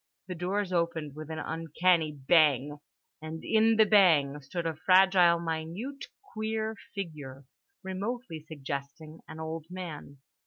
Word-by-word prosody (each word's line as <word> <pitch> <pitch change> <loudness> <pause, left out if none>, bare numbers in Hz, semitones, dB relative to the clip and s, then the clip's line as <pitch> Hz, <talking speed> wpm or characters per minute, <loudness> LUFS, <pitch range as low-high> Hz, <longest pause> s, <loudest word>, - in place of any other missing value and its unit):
The 185 - -5
doors 185 +2 -2
opened 165 -4 -1
with 155 0 -8
an 160 - -5
uncanny 165 +1 +1
bang 145 -1 +2 0.4
and 160 +1 -7
in 225 +1 +4
the 220 0 +6
bang 160 -9 +4
stood 165 +5 -5
a 165 - -1
fragile 185 0 +5
minute 170 - -5 0.3
queer 220 0 -2 0.2
figure, 145 -8 -7 0.4
remotely 195 0 -4
suggesting 145 +2 -7
an 160 - -9
old 160 0 -5
man. 170 -6 -8
165 Hz, 125 wpm, -29 LUFS, 155-190 Hz, 0.4 s, the